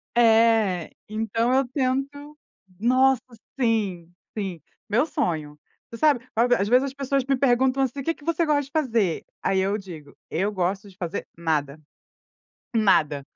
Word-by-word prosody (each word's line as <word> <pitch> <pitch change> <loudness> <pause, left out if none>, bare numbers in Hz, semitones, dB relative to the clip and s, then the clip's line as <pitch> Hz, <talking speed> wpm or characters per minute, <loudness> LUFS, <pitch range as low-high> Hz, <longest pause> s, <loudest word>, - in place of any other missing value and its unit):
É. 225 -6 +3 0.2
Então 225 +3 0
eu 265 -1 +2
tento 280 +3 -2 0.4
nossa, 255 +3 +3 0.4
sim, 200 -8 0 0.3
sim, 190 -6 -4 0.3
meu 240 +7 +3
sonho. 155 - -3 0.3
Você 230 - -7
sabe, 290 -5 +3
a 225 - +3 0.2
às 200 - 0
vezes 250 +4 +4
as 270 - -5
pessoas 275 -1 -1
me 275 0 +2
perguntam 260 0 +2
assim: 265 +1 -3
"Que 330 - 0
que 300 - -20
você 335 +1 +1
gosta 300 -2 +2
de 275 - -14
fazer?", 230 - 0 0.2
aí 190 - +1
eu 195 +2 +1
digo: 170 -8 -11
"Eu 195 +6 -1
gosto 195 +1 -2
de 190 - -18
fazer 175 -4 -4
nada. 155 -3 -1 1.0
Nada. 155 -10 +3
225 Hz, 155 wpm, -24 LUFS, 190-270 Hz, 1.0 s, vezes